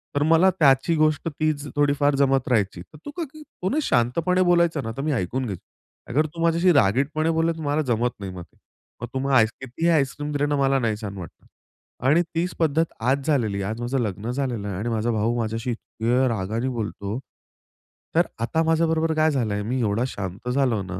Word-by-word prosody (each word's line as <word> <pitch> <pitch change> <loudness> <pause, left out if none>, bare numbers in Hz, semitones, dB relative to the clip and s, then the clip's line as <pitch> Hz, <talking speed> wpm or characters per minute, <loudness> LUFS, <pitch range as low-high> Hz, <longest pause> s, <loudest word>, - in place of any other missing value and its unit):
तर 145 - +2
मला 165 +4 +6
त्याची 140 +3 +4
गोष्ट 155 +1 +1
तीच 150 -1 -1
थोडीफार 145 0 +2
जमत 135 -1 +2
राहायची, 100 -7 +1
तर 155 - -15
तू 290 - -5
का 340 - -1
की 310 - -12
तो 185 -10 -5
ना 285 - -1
शांतपणे 165 - +1
बोलायचा 170 -4 +3
ना 115 - -4
तर - - -2
मी 150 +2 -1
ऐकून 125 +4 -1
घ्यायचो. 100 -7 -6 0.5
अगर 150 +5 +2
तू 165 +2 -7
माझ्याशी 170 +2 +4
रागीटपणे 140 +7 +2
बोलला 165 +1 +1
तर 160 - -7
मला 145 +1 +1
जमत 120 -2 0
नाही 95 -2 -6
मग. 90 -1 -7
तर - - -23 0.5
मग - - -3
तू 135 +1 -2
आइस 115 -3 +5
कितीही 130 +7 -1
आईस्क्रीम 145 0 0
दिलं 145 0 0
ना 145 - +1
मला, 135 -1 +2
नाही 115 -3 0
छान 100 -2 -6
वाटणार. 85 -4 -11 0.6
आणि 155 +5 +5
तीच 175 +2 0
पद्धत 160 0 +2 0.2
आज 135 +3 +1
झालेली 110 -10 +1
आहे, 100 - -2
आज 115 +2 -6
माझं 125 +2 -1
लग्न 110 +1 -3
झालेलं 125 -6 -2
आहे 95 - -4
आणि 110 +5 -2
माझा 115 +1 0
भाऊ 115 +2 0
माझ्याशी 115 +2 -2
इतक्या 120 +2 0
रागाने 110 +4 -2
बोलतो. 110 -2 -4 1.0
तर - - +4
आता 160 +8 +1
माझ्याबरोबर 160 0 +2
काय 155 0 +3
झालंय, 110 -7 -1
मी 125 +5 -2
एवढा 110 +2 +1
शांत 100 +1 -6
झालो 125 -5 +1
ना, 90 -1 -6
130 Hz, 205 wpm, -24 LUFS, 110-155 Hz, 1.0 s, मला